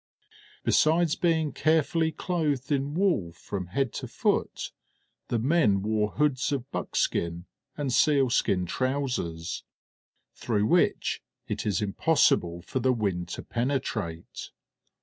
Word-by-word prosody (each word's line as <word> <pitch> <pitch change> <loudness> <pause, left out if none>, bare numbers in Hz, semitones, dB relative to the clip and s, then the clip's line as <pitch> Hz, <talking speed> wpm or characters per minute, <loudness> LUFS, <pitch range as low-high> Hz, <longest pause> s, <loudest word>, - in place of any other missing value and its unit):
Besides 160 +1 +3
being 160 -4 +1
carefully 160 +2 +2
clothed 155 -5 -1
in 140 +1 0
wool 170 - +1
from 95 +1 -5
head 130 +5 -1
to - - -5
foot, - - -1 0.6
the 120 - 0
men 115 - +3
wore 105 0 0
hoods 145 -2 +1
of 135 -1 -3
buckskin 85 +1 -1 0.3
and 140 -4 -1
sealskin 130 - +3
trousers, 125 -9 -2 0.7
through 105 -3 0
which - - +2 0.3
it - - -3
is 100 0 +1
impossible 95 - +2
for 130 - -3
the 130 +1 +3
wind 95 -7 -1
to - - -6
penetrate. 115 -9 -3
130 Hz, 115 wpm, -27 LUFS, 100-150 Hz, 0.7 s, Besides